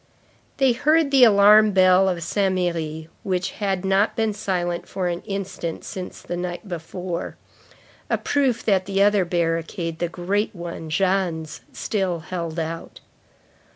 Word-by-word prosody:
They 270 -2 +4
heard 305 +4 +2
the 270 -2 +6
alarm 210 -1 +7
bell 185 0 +5
of 175 -2 -2
Saint 195 +2 0
Merry, 160 -3 -2
which 180 -2 -2
had 195 -3 -2
not 195 +2 +2
been 220 -1 0
silent 180 -4 -2
for 185 -2 -2
an 175 0 -2
instant 195 -4 -4
since 185 -1 -7
the 175 - -4
night 175 +3 -5
before; 175 0 -5 0.7
a - - +2
proof 265 -5 0
that 195 -3 +2
the 195 0 +2
other 205 -2 +3
barricade, 165 0 -2
the 175 - -1
great 195 +5 -2
one, 170 -2 -7
Jeanne's, 170 -3 -1
still 190 -5 -2
held 170 -1 -5
out. 165 0 -5
185 Hz, 145 wpm, -23 LUFS, 170-200 Hz, 0.7 s, alarm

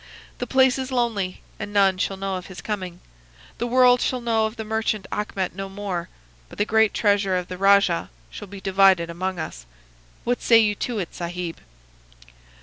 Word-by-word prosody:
The - - -3
place 265 0 +4
is 260 0 -4
lonely, 225 -7 -1 0.2
and 205 - -5
none 195 -2 +3
shall 195 +1 -1
know 195 0 -3
of 180 -1 -6
his 185 -3 -10
coming. 185 -1 -5 0.6
The 240 - -1
world 250 0 +5
shall 255 - 0
know 225 -2 +1
of 220 - -9
the 220 -2 -6
merchant 215 -2 -1
Achmet 195 -3 -2
no 195 +1 -6
more, 195 -3 -4 0.4
but - - -13
the 205 - +1
great 220 -1 +3
treasure 200 -3 +2
of 180 -1 -4
the 180 - -5
rajah 195 -3 +4 0.2
shall - - -8
be 200 +1 -9
divided 190 -3 +3
among 185 +2 -3
us. 160 - -7 0.6
What 245 +1 -1
say 230 - +6
you 215 -2 +4
to 235 +3 -3
it, 180 -5 -4
Sahib? 175 -1 -5
200 Hz, 185 wpm, -23 LUFS, 185-220 Hz, 0.6 s, say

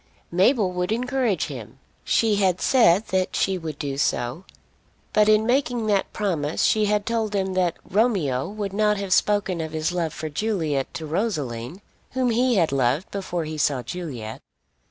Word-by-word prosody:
Mabel 195 +3 +3
would 180 +2 -2
encourage 245 -2 0
him. - - -8 0.3
She 220 -3 +2
had 190 -3 +2
said 220 -6 +4
that 185 -1 0
she 190 -1 +1
would 155 -3 -6
do 140 -2 -4
so. 125 +6 -1 0.7
But 210 0 +4
in 215 0 +4
making 245 -2 +1
that 205 -2 +1
promise 165 -8 -1
she 215 -1 +3
had 210 0 +1
told 225 -2 -1
him 190 -1 0
that 180 -2 +1
Romeo 190 - +1
would 205 -2 -4
not 210 0 +2
have 195 -2 0
spoken 195 -4 +1
of 160 0 -5
his 155 +1 -1
love 170 -3 -1
for 155 - -5
Juliet 155 -5 -1
to 160 - -4
Rosaline, 155 - -3 0.3
whom 255 -2 +1
he 245 +1 +2
had 170 -7 +2
loved 135 +5 0
before 180 -4 -3
he 155 0 -5
saw 135 -3 +1
Juliet. 120 -7 -6
190 Hz, 170 wpm, -24 LUFS, 155-215 Hz, 0.7 s, said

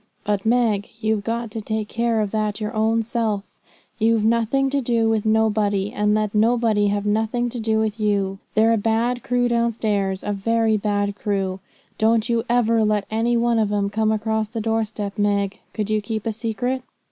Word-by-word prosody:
But, 205 0 -1
Meg, 225 -4 +2
you've 220 -1 0
got 230 +1 -3
to 225 - -5
take 215 0 -3
care 230 -1 0
of 205 -2 -2
that 215 -1 -1
your 210 -1 -3
own 225 +1 +1
self. 220 -3 -1 0.6
You've 225 0 +3
nothing 235 +4 +2
to 280 0 +1
do 230 -2 +1
with 220 -1 +1
nobody, 210 -2 +1
and 210 0 +1
let 215 -1 0
nobody 220 -1 +2
have 205 0 -1
nothing 225 +3 0
to 245 - -5
do 220 0 0
with 220 0 -1
you. 200 -2 0 0.2
They're 220 +2 +4
a - - +2
bad 230 +3 0
crew 245 +1 +1
downstairs, 220 -5 0
a 205 - -1
very 225 +2 +1
bad 205 -1 -1
crew. 195 -2 -2 0.4
Don't 225 0 +3
you 230 -1 +1
ever 230 -2 +3
let 210 -2 +1
any 230 +2 +1
one 235 0 +2
of 210 -2 +1
'em 200 -1 0
come 220 +1 +1
across 220 0 -1
the 230 0 -4
door 225 0 0
step. 210 -1 -6
Meg, 200 -1 0
could 215 -1 -3
you 215 0 +1
keep 215 0 -4
a 225 - 0
secret?' 240 +4 -2
220 Hz, 195 wpm, -22 LUFS, 205-230 Hz, 0.6 s, They're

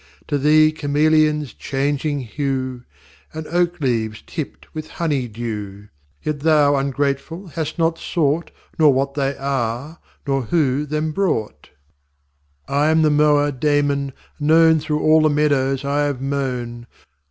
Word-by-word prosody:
To 145 -2 0
Thee 155 +2 +5
Chameleons 150 -2 +1
changing 145 +1 -2
hue, 130 0 -3 0.5
And 160 0 -5
Oak 175 +1 0
leaves 115 -6 -1
tipt 155 -4 -7
with 155 0 -6
hony 145 -7 -1
dew. 105 -3 -6 0.3
Yet 150 -1 -2
Thou 145 -1 +4
ungrateful 140 +6 -2
hast 155 +1 -4
not 165 0 +1
sought 160 0 0 0.3
Nor 150 -3 +6
what 135 +1 0
they 140 -1 -1
are, 135 +3 -3 0.3
nor 135 -2 0
who 145 0 +1
them 155 +1 -1
brought. 115 - -2 1.0
VI 140 - -6
I 145 +2 +3
am 160 0 +3
the 155 - +4
Mower 145 -1 +3
Damon, 140 0 0 0.3
known 160 +2 +5
Through 150 0 -2
all 155 0 +5
the 155 - +4
Meadows 140 -2 +1
I 145 +1 +1
have 140 -3 -2
mown. 125 -4 -3
145 Hz, 140 wpm, -20 LUFS, 135-155 Hz, 1.0 s, Nor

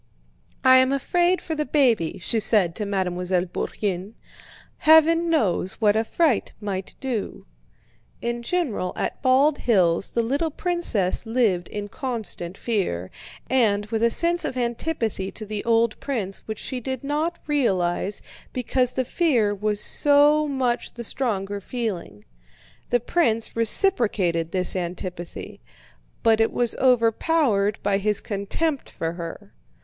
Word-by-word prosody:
"I 260 0 +7
am 260 +1 +4
afraid 350 +6 +1
for 320 - -4
the 305 -1 -1
baby," 250 - +1
she 220 +5 -1
said 205 -5 +3
to 210 - -3
Mademoiselle 180 -2 -1
Bourienne: 190 +2 -4 0.6
"Heaven 325 +2 +5
knows 195 - +2
what 210 -2 +2
a 220 - +2
fright 285 -1 0
might 195 -3 -5
do." 250 -7 -4 0.7
In 235 0 -3
general 235 - -2
at - - -3
Bald 275 +3 +3
Hills 185 -6 +2
the 235 - +1
little 280 +8 0
princess 295 - 0
lived 220 -7 +1
in 205 0 -5
constant 205 -7 -4
fear, 175 - -2 0.4
and 215 -6 +2
with 225 -1 -1
a 235 - +4
sense 345 +7 +1
of 255 - -3
antipathy 235 -5 -2
to 215 - -6
the 210 0 -4
old 230 -1 +2
prince 210 -9 -3
which 220 -1 -4
she 255 +3 -5
did 260 +1 -5
not 305 +4 -1
realize 200 - 0 0.3
because 250 0 0
the 260 - 0
fear 240 -10 +1
was 210 +1 -2
so 295 +4 +3
much 255 -4 -1
the 240 - -6
stronger 205 -5 -2
feeling. 185 - -5 0.6
The 245 - +2
prince 230 -4 0
reciprocated 210 - +3
this 185 0 0
antipathy, 180 -1 -6 0.6
but 225 -1 +4
it 225 - +2
was 240 -2 0
overpowered 230 -3 +2
by 200 -1 +1
his 210 0 +1
contempt 245 +9 -2
for 165 0 -4
her. 165 - -8
225 Hz, 135 wpm, -23 LUFS, 195-265 Hz, 0.7 s, I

